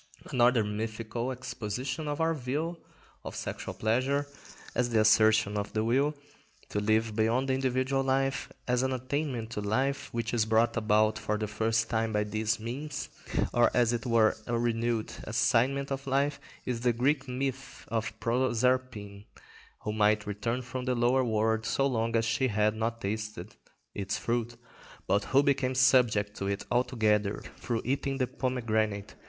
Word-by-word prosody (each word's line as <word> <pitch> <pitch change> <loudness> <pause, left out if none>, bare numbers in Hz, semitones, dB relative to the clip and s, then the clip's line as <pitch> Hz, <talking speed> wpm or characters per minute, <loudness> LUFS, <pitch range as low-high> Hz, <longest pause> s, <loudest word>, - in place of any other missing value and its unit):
Another 120 -2 +4
mythical 110 +3 -3
exposition 125 +3 -4
of 145 0 -2
our 165 0 +2
view 155 +5 -3 0.5
of - - -7
sexual - - -5
pleasure 130 +6 +1 0.5
as 125 0 +1
the 115 -2 +2
assertion 110 -1 +4
of 100 - -5
the 110 0 +1
will 135 +6 +2 0.5
to 105 - -1
live 110 +1 +1
beyond 115 +4 +2
the - - +3
individual 130 +1 +1
life, 135 0 0 0.2
as 125 0 +2
an 130 0 0
attainment 130 -3 -3
to 105 - -3
life 130 +7 -1
which 115 0 -3
is 110 -2 +2
brought 115 +1 +3
about 110 -1 +2
for 105 - -1
the 110 - -2
first 110 +1 0
time 115 -1 0
by 105 0 +2
this 110 +1 -1
means, 140 +6 -5 0.4
or 120 0 +5
as 120 -1 +3
it 120 0 -2
were 115 -2 +4
a 120 - 0
renewed 115 -1 0
assignment 135 +4 +1
of 135 0 -4
life, 140 +2 +1 0.3
is 120 -2 -2
the 120 -1 +2
Greek 135 +4 +1
myth 130 +1 -4
of 115 0 -3
Proserpine, 120 -4 0 0.6
who 105 - -2
might 105 0 +3
return 115 +5 -2
from 125 +1 -5
the 125 -1 +1
lower 125 +2 +3
world 110 -1 +1
so 115 +5 +1
long 115 -3 0
as 115 0 +2
she 120 +4 +1
had 105 -1 +2
not 115 +1 -2
tasted 105 +1 -4 0.4
its 100 -1 -2
fruit, 120 0 -2 0.5
but 100 +1 +1
who 140 +2 +4
became 135 -2 +1
subject 125 -5 +4
to 100 - -3
it 100 0 -2
altogether 110 -5 +1
through 115 -2 -2
eating 135 +1 -1
the 130 - +1
pomegranate. 110 -6 -1
120 Hz, 160 wpm, -29 LUFS, 110-130 Hz, 0.6 s, or